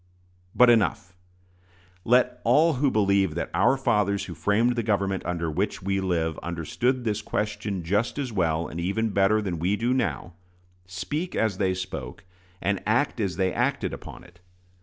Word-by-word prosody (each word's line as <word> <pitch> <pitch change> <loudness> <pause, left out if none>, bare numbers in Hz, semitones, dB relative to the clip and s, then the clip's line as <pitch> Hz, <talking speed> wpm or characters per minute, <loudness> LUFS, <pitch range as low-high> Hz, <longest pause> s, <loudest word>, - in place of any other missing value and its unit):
But 125 -1 +7
enough! 100 -5 +1 0.9
Let 125 +2 +2
all 155 +8 +4
who 140 +1 +1
believe 100 -6 +2
that 85 - -3
"our 120 +10 +3
fathers 100 -5 +1
who 90 - -7
framed 105 - +1
the 120 - 0
government 100 -3 0
under 85 -2 -2
which 95 +4 -2
we 95 0 0
live 85 -4 -1
understood 100 - -2
this 110 -2 -1
question 105 -3 -3
just 105 - 0
as 135 -4 -3
well, 85 -5 0
and 85 - -7
even 100 +6 0
better, 100 +2 +2
than 90 -5 -3
we 90 +5 +1
do 120 +4 0
now," 110 -8 -2 0.5
speak 145 - -4
as 110 -4 0
they 95 -2 +1
spoke, 90 -9 -6 0.4
and 100 +1 0
act 125 +4 +1
as 95 -5 -1
they 95 0 0
acted - - -1
upon - - -9
it. 90 -1 -19
100 Hz, 165 wpm, -25 LUFS, 90-115 Hz, 0.9 s, But